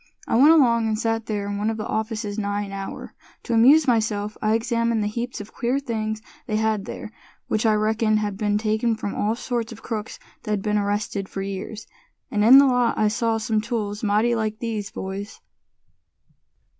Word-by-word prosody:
I - - +1
went 275 +6 +7
along, 235 -8 +5
and 215 -1 0
sat 225 0 -1
there 205 -2 -2
in 205 0 -3
one 210 +2 0
of 225 - -2
the 215 - -4
offices 220 -1 -3
nigh 205 0 -1
an 200 - -8
hour. 195 0 -7 0.3
To 240 - -3
amuse 270 +7 +6
myself, 215 -3 0
I 215 +1 +2
examined 230 -1 0
the - - 0
heaps 235 +3 -4
of 205 +1 -9
queer 245 +2 0
things 220 -5 -3 0.2
they 215 - -1
had 215 -2 0
there, - - -7 0.4
which 215 +1 +1
I 215 - +4
reckoned 215 0 +2
had 210 -2 -2
been 205 0 0
taken 220 +2 0
from 210 -2 -4
all 215 +2 0
sorts 235 -1 -3
of 225 - -11
crooks 220 -2 -5 0.2
that'd 210 -2 -2
been 210 -1 +1
arrested 205 -1 -2
for 195 - -4
years. 200 +2 -6 0.5
And 210 -1 +1
in 245 +5 +9
the 280 - +8
lot 245 -3 +2
I 215 - +3
saw 225 +1 0
some 220 0 0
tools 210 -2 -3
mighty 215 +3 +2
like 215 -2 -1
these, 220 -3 -3
boys!" 195 +2 -6
215 Hz, 195 wpm, -23 LUFS, 210-230 Hz, 0.5 s, in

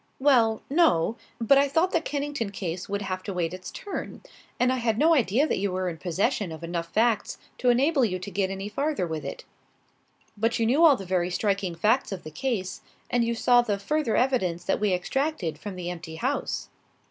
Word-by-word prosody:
"Well, 240 -6 +3
no. 275 - +3 0.2
But 255 +4 +5
I 280 - +3
thought 325 +6 +2
the 335 - +2
Kennington 285 -7 -3
case 185 -2 -5
would 200 0 -2
have 185 -1 -3
to 195 - -5
wait 175 -1 -1
its 185 0 -7
turn. 405 - -6 0.4
And 250 +1 +3
I - - -1
had 230 -3 0
no 320 +6 +5
idea 255 - +3
that - - -1
you 200 -1 0
were 185 0 -1
in 165 -2 -7
possession 195 +2 -1
of 160 +1 -8
enough 170 0 -3
facts 225 +2 +1 0.2
to 250 - +2
enable 270 +4 +3
you 185 -5 +1
to 185 +2 -7
get 190 0 0
any 195 +1 -4
farther 280 0 -1
with 160 -2 -4
it." - - -7 0.9
"But 225 +2 0
you 230 - +1
knew 270 +9 +3
all 310 -4 +8
the 195 - -7
very 180 -1 0
striking 195 -2 -1
facts 220 +10 +2
of 190 -3 -5
the 155 - -8
case, 190 - -3 0.3
and 245 -1 +3
you 235 0 0
saw 245 +1 +5
the 210 -4 -1
further 300 +3 0
evidence 190 -10 +1
that - - 0
we 210 -1 +1
extracted 190 - -1
from 205 -3 -6
the 180 -1 -4
empty 165 -2 -8
house." 260 - -2
215 Hz, 210 wpm, -26 LUFS, 185-265 Hz, 0.9 s, all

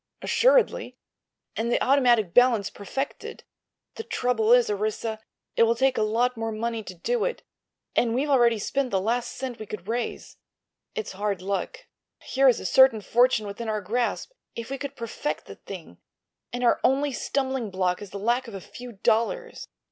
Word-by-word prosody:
"Assuredly. - - +2 0.6
And 230 +2 -1
the - - +3
automatic 245 -9 +3
balance 245 -5 +4
perfected. 270 +7 -5 0.5
The 450 - -4
trouble 245 - 0
is, 245 -1 +6
Orissa, 215 +2 -2 0.4
it - - +2
will 230 0 +5
take 265 +2 +2
a - - 0
lot 235 +4 +1
more 225 0 -3
money 225 +1 -2
to 185 -3 -9
do 445 - -1
it, - - -2 0.5
and 230 -1 +2
we've 275 +4 0
already 240 -5 +4
spent 270 +5 -1
the 195 - +1
last 235 +5 -1
cent 255 -2 -5
we 215 - -7
could 195 -3 -7
raise. 235 +2 -4 0.6
It's 445 -2 -4
hard 200 -1 -3
luck. 200 - -3 0.4
Here 270 +1 +2
is 245 - +2
a - - -8
certain 260 +1 +5
fortune 235 +2 +3
within 215 +3 -5
our 215 -1 0
grasp, 235 - -2 0.2
if 230 +2 -6
we 275 - -3
could 280 0 -6
perfect 235 +5 -4
the - - -9
thing, - - -10 0.5
and 245 0 -3
our 240 - +4
only 275 +2 +2
stumbling 265 -3 -2
block 185 -1 -1
is 205 - -8
the 200 - -7
lack 240 +5 0
of 225 - -8
a - - -5
few 245 +5 -10
dollars." 235 - -1
235 Hz, 180 wpm, -26 LUFS, 215-265 Hz, 0.6 s, is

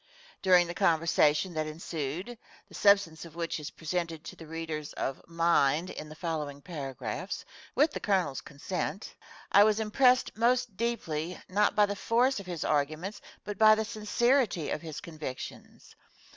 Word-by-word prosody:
During 180 -2 +6
the 175 - -5
conversation 165 0 +3
that 155 -1 -1
ensued 160 - -4 0.3
(the - - -18
substance 200 -6 +3
of 165 -2 -12
which 170 -1 -2
is 150 - -6
presented 165 -1 -3
to - - -8
the 160 - -12
readers 160 -2 -5
of 135 - -3
Mind 165 0 +2
in 150 - -7
the 155 - -10
following 150 -4 -3
paragraphs, 140 - -5 0.3
with 295 +4 +4
the - - -4
Colonel's 185 -9 0
consent) 180 +7 -4 0.4
I 200 - +8
was 215 0 +3
impressed 250 +4 +3
most 235 -1 +2
deeply, 180 -7 -2
not 205 +3 +2
by 210 0 +6
the 205 0 -3
force 240 +4 +2
of 195 - -10
his 175 -4 -4
arguments, 155 +7 -1 0.2
but 205 -1 -6
by 215 0 +8
the 220 0 -1
sincerity 225 - +1
of - - -2
his 160 -3 -7
convictions. 155 -6 -8
170 Hz, 160 wpm, -30 LUFS, 155-210 Hz, 0.4 s, I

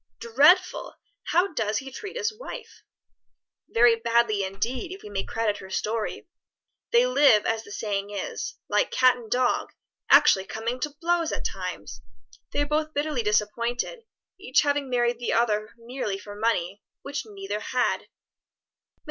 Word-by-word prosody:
"Dreadful! 285 +11 +3 0.3
How 360 +1 +2
does 220 -5 0
he 270 -1 -6
treat 410 - -7
his 450 -2 -1
wife?" 465 0 -9 0.9
"Very 235 0 +5
badly 230 -3 +2
indeed, 235 - -3
if 385 - -9
we - - -9
may 195 -1 -2
credit 220 -2 -1
her 190 - -10
story. 215 +3 -3 0.6
They 475 +1 +5
live, 285 - +5
as 225 0 0
the 205 - -13
saying 200 -2 -3
is, 205 -2 -4
like - - +2
cat 255 -1 +4
and 235 -3 -11
dog, 250 +1 +1 0.4
actually 190 0 +6
coming 230 +5 -4
to 295 +2 -4
blows 340 -1 +1
at - - -4
times. 100 - -5 0.5
They 290 - +1
are - - -2
both 305 +1 -1
bitterly 290 -3 0
disappointed, 235 - -1 0.3
each 260 -8 +2
having 285 -2 0
married 240 -1 +1
the 240 - -1
other 215 -2 +1
merely 230 -4 -4
for 205 +1 -10
money; 205 -3 -1 0.2
which 280 0 -4
neither 200 0 -5
had." 250 +4 0
Mr. - - -21
235 Hz, 155 wpm, -26 LUFS, 210-290 Hz, 0.9 s, actually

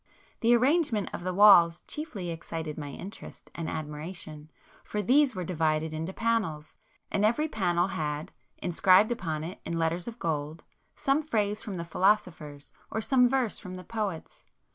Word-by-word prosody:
The 235 0 +5
arrangement 255 - +2
of - - -5
the 185 - -1
walls 180 -4 +7
chiefly 210 - -5
excited 160 -1 -5
my 145 -2 -6
interest 185 +8 -10
and 165 -1 -4
admiration, 155 0 -7 0.3
for 210 - -4
these 260 +4 +3
were 185 - -3
divided 160 -2 0
into 160 +3 -3
panels, 195 -9 -1 0.4
and 200 - +1
every 240 +9 +2
panel 180 - +1
had, 150 -3 -3 0.3
inscribed 185 +5 +4
upon 160 -9 -2
it 175 +4 -7
in 170 0 -3
letters 165 +2 0
of 235 0 -6
gold, 155 -3 -3 0.3
some 275 +3 +1
phrase 210 -8 -1
from 205 -4 -6
the 170 -1 -4
philosophers, 165 -6 0 0.2
or 220 - -2
some 250 +2 +4
verse 255 -4 0
from 185 -2 -8
the 185 - -8
poets. 205 -5 -5
185 Hz, 160 wpm, -28 LUFS, 160-220 Hz, 0.4 s, walls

